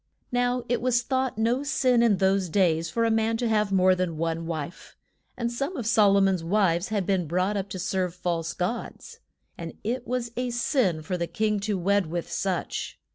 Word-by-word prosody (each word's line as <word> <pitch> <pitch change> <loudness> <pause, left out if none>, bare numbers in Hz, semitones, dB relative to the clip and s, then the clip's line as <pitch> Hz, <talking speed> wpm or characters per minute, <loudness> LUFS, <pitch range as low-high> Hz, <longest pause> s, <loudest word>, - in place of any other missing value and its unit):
Now 245 0 +1
it 245 - 0
was 245 -1 +2
thought 260 -2 -1
no 230 +4 +1
sin 255 -4 +2
in 225 -4 +4
those 190 -1 +2
days 165 -3 +2
for 230 +6 0
a 225 - +2
man 225 0 +1
to 240 0 -1
have 210 -2 +1
more 185 -1 +5
than 180 -3 -2
one 165 0 -2
wife. 160 0 -6 0.4
And 235 -1 -1
some 275 +8 -3
of 245 - -4
Sol 210 -3 +5
o - - +4
mon's 190 -3 +2
wives 175 -1 +2
had 205 -4 -1
been 185 -4 0
brought 185 +5 0
up 200 -1 -3
to - - -5
serve 185 -1 -1
false 170 -2 -2
gods. 185 +7 -4 0.4
And 165 -2 -6
it 245 +3 -3
was 245 -1 -2
a 250 0 -1
sin 235 - 0
for 180 +3 -3
the 170 - -1
king 215 -1 0
to 205 0 -1
wed 200 0 +1
with 170 +1 -4
such. 185 -3 -3
200 Hz, 205 wpm, -26 LUFS, 180-235 Hz, 0.4 s, more